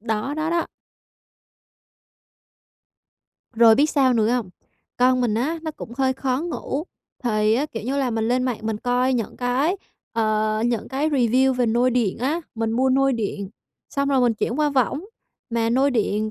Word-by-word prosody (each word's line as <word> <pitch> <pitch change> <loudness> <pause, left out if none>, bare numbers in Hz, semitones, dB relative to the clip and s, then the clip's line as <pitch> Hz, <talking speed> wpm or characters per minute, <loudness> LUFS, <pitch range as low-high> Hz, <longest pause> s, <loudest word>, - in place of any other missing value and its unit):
Đó, 225 +5 -2
đó, 310 +1 -1
đó. 340 0 0 2.9
Rồi 225 -1 +7
biết 295 +4 +3
sao 265 -3 +3
nữa 220 -2 +2
hông? 240 -7 -1 0.5
Con 255 0 +3
mình 235 -4 +1
á, 295 +9 -1
nó 315 - -3
cũng 235 -6 -10
hơi 265 -1 +2
khó 260 0 -1
ngủ, 315 -3 -4 0.4
thì, 215 0 +2
kiểu 225 - -5
như 265 +5 -2
là, 260 -3 0
mình 225 0 -1
lên 250 +1 +1
mạng 250 -3 -1
mình 220 -1 -2
coi 250 +2 +1
những 230 -4 -3
cái, 260 +9 0 0.4
ờ, 215 -1 0
những 235 -3 -2
cái 285 +4 -1
review 260 0 +3
về 250 -1 0
nôi 240 +3 +2
điện 235 -6 0
á, 285 +8 -1
mình 225 -1 -1
mua 260 +3 +2
nôi 270 +1 +3
điện 205 -4 -3 0.4
xong 280 -1 -1
rồi 270 -2 +3
mình 240 -2 +3
chuyển 235 +5 -2
qua 300 -1 +3
võng. 275 - 0 0.5
Mà 230 -1 0
nôi 270 +3 +3
điện 215 -3 0
250 Hz, 175 wpm, -23 LUFS, 225-270 Hz, 2.9 s, Rồi